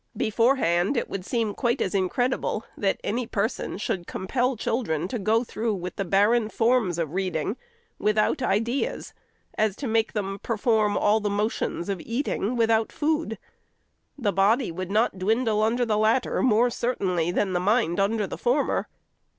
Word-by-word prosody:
Beforehand, 220 -3 +2
it - - -2
would 195 -2 -4
seem 225 0 -1
quite 240 +1 0
as 185 - -1
incredible, 215 +4 0
that 195 -2 0
any 235 +3 -2
person 215 -1 -2
should 190 -4 -3
compel 250 +7 -1
children 180 - -1
to 240 - -3
go 220 +4 +2
through 225 -2 -2
with 180 -1 -6
the 195 - -2
barren 210 +5 +3
forms 225 -7 +1
of 165 -3 -2
reading, 185 0 -1 0.4
without 215 +7 +1
ideas, 235 +3 -1 0.5
as 215 -2 +2
to 280 - -6
make 225 -1 +1
them 195 -2 -3
perform 220 -2 +1
all 210 +1 +3
the 210 -1 -1
motions 205 -4 -2
of 195 -4 -3
eating, 235 -2 -2
without 225 -1 +2
food. 305 -7 -1 0.8
The 210 -7 0
body 210 +4 +2
would 185 +2 -5
not 210 -2 +1
dwindle 220 +2 +1
under 235 +3 +2
the 215 -2 +1
latter 220 +4 +2
more 240 0 +3
certainly 185 -9 -1
than 190 +1 0
the 180 - +1
mind 200 -1 +1
under 210 +2 +1
the - - -7
former. 265 +4 +1
215 Hz, 160 wpm, -25 LUFS, 195-235 Hz, 0.8 s, barren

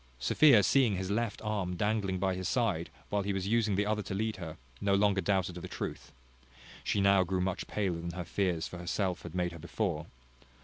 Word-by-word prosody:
Sophia 105 - +6
seeing 125 -2 +4
his 95 +1 -3
left 115 +1 -1
arm 100 -4 -1
dangling 100 -1 0
by 95 0 +1
his 90 -1 -3
side, 100 -9 0 0.2
while 105 -1 +1
he 100 0 -1
was 95 0 -2
using 110 -2 +2
the 105 +2 +1
other 105 0 0
to 95 - -5
lead 110 +2 -1
her, 80 -3 -7 0.2
no 100 -1 +3
longer 100 -1 +3
doubted 95 -3 0
of - - -6
the - - -7
truth. - - -5 0.7
She - - 0
now 100 -1 +5
grew 90 +1 -1
much 95 +1 -2
paler 95 -5 -1
than 85 0 -5
her 90 -1 -5
fears 90 -2 0
for 90 - -8
herself 90 +1 -1
had 80 - -9
made 90 -1 0
her 85 - -9
before. 85 -1 -2
95 Hz, 215 wpm, -31 LUFS, 90-105 Hz, 0.7 s, Sophia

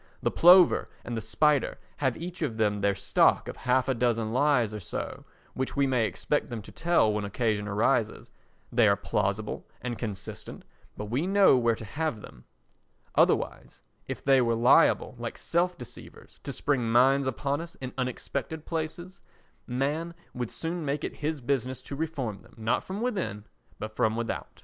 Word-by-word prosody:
The - - +2
plover 180 +1 +6 0.2
and 120 - -4
the 110 - -2
spider 145 +6 +2 0.2
have 130 -4 0
each 175 +1 -7
of 125 -8 -2
them 105 -2 +1
their 100 0 +2
stock 100 - +3
of - - -5
half 125 +1 +1
a 135 - +2
dozen 115 -2 0
lies 125 -5 +3
or 105 - -4
so 90 - -6 0.3
which 130 0 -3
we 140 -1 +3
may 125 -4 +2
expect 150 - -1
them 120 -2 -4
to - - -12
tell 165 -11 +2
when 105 0 -1
occasion 105 0 -1
arises; 105 +1 0 0.4
they 115 -2 +4
are 100 - +5
plausible 100 +1 -2
and 120 -2 -5
consistent, 100 -5 -6 0.3
but 105 0 -6
we 140 +9 0
know 195 -5 +6
where 120 -2 +2
to 110 - -9
have 155 +1 -2
them; - - -13 0.7
otherwise, - - +1 0.3
if - - -5
they 135 -1 +5
were 115 -1 +2
liable, 125 +7 +4
like 120 0 -5
self 175 +1 0
deceivers, 125 - -11
to - - -5
spring 125 -6 0
mines 135 +3 +4
upon 140 +2 -1
us 170 0 -9
in 130 -1 -7
unexpected 135 +4 -4
places, 170 +3 -5 0.5
man 145 +7 -2 0.2
would 125 -2 -3
soon 170 +1 -4
make 145 0 -2
it - - -4
his 150 -1 -2
business 130 0 -1
to 140 - -7
reform 140 -9 -3
them—not 110 +2 -2
from 195 +3 -5
within, 190 - -2 0.3
but 110 0 -7
from 110 0 +2
without. 115 0 -4
125 Hz, 175 wpm, -28 LUFS, 110-150 Hz, 0.7 s, plover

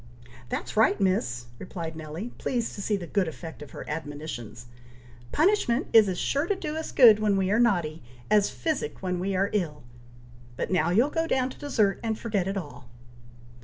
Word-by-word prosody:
"That's - - -4
right, 215 -1 +4
Miss!" 125 -12 0
replied 165 -3 -6
Nelly, 160 +8 -6
pleased 240 -3 -1
to 200 - -6
see 205 +1 0
the 180 - -6
good 190 +1 0
effect 160 -1 -8
of 150 - -9
her - - -9
admonitions. 145 -7 -6 0.7
"Punishment 310 - +2
is 220 -3 +7
as 180 - -2
sure 285 - 0
to 405 - +1
do 310 -5 -4
us 320 0 -4
good 225 -5 +8
when 210 -2 +2
we 190 0 +1
are 220 - +3
naughty, 175 -9 +1 0.3
as 210 -1 +4
physic 315 - -3
when 180 -1 -1
we 195 +2 -1
are 195 +2 +1
ill. 160 -8 -2 0.7
But - - -3
now 175 -3 +2
you'll 235 +11 +3
go 325 0 0
down 260 -4 +1
to - - -13
dessert, 215 -9 +1
and 225 -2 -2
forget 210 -6 -1
it 195 +1 -2
all." 145 -8 -8
195 Hz, 190 wpm, -27 LUFS, 165-230 Hz, 0.7 s, good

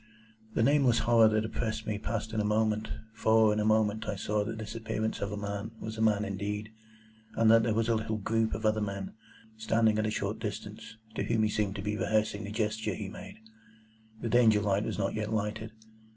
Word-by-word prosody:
The - - +3
nameless 135 -3 +4
horror 115 -2 +6
that 110 0 +1
oppressed 110 0 -3
me 105 -1 -2
passed 110 0 -3
in 110 - 0
a - - +2
moment, 110 0 +1 0.2
for 110 -1 +4
in 105 - -1
a - - +1
moment 110 0 +2
I 100 - -1
saw 105 +2 -1
that 110 +2 -5
this 110 0 -6
appearance 110 -1 -3
of 100 - -2
a 105 - -4
man 100 +1 -4
was 110 0 -6
a 110 - -4
man 105 -1 +3
indeed, 105 +2 -4 0.6
and 110 -1 +5
that 115 0 +7
there 110 -1 0
was 115 0 +1
a 115 - +3
little 110 0 -1
group 110 +2 0
of 110 - -5
other 110 0 +2
men, 100 -2 -4 0.4
standing 110 0 +2
at 110 - +1
a - - 0
short 105 - -2
distance, 110 - -6 0.2
to - - -3
whom 115 -2 +1
he 110 - +2
seemed 105 -2 -1
to 100 - -5
be 105 0 -2
rehearsing 110 -1 0
the 100 - -6
gesture 110 -1 -1
he - - -5
made. - - -10 0.8
The 115 - -2
Danger 110 -3 +5
light 100 +1 +1
was - - -3
not - - -1
yet 110 0 -3
lighted. 110 +1 -2
110 Hz, 220 wpm, -30 LUFS, 105-110 Hz, 0.8 s, that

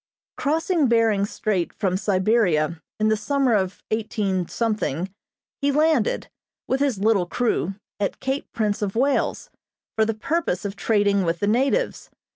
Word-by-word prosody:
Crossing 320 +1 +1
Behring 225 -4 +3
Strait 195 -5 -1
from 190 -4 -1
Siberia 185 -5 +1 0.2
in 215 0 +3
the 220 - +3
summer 270 +2 +1
of 190 -2 -1
18, 210 -5 -1 1.1
he 285 0 +2
landed, 300 -5 +2 0.4
with 260 - 0
his 275 -6 +1
little 200 -3 +2
crew, 195 -4 0 0.2
at 200 - -2
Cape 270 +2 -3
Prince 210 -2 -1
of 200 -1 -2
Wales, 270 +4 0 0.4
for 220 - +3
the 220 0 0
purpose 220 - -1
of 200 0 -3
trading 205 -3 +2
with 170 -1 -1
the - - 0
natives. 270 - +1
215 Hz, 140 wpm, -23 LUFS, 195-265 Hz, 1.1 s, Behring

